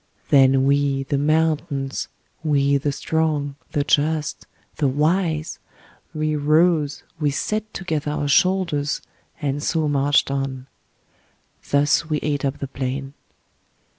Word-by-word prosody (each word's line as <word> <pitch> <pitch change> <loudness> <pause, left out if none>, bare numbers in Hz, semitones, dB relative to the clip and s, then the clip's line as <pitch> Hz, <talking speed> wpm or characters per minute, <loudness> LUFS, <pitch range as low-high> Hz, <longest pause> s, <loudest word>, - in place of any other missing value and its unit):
Then 135 -1 +5
we, 140 -1 +2
the 140 +1 -1
mountains, 150 -2 0 0.4
we 140 -2 +2
the 145 +1 -1
strong, 150 -1 -1 0.2
the 145 -3 +1
just, 150 +1 0 0.3
the 145 - +2
wise, 155 +3 0 0.5
we 155 -1 -1
rose, 155 0 +2 0.2
we 150 -2 +2
set 215 +9 -2
together 160 -7 -3
our 150 -1 -2
shoulders 165 -2 +1 0.4
and 140 0 -1
so 160 0 0
marched 145 -1 +2
on. 135 -2 -3 1.0
Thus 145 +3 +2
we 155 - +1
ate 145 -2 -1
up 135 0 -1
the 140 - -5
plain. 135 +1 -4
145 Hz, 120 wpm, -22 LUFS, 140-155 Hz, 1.0 s, Then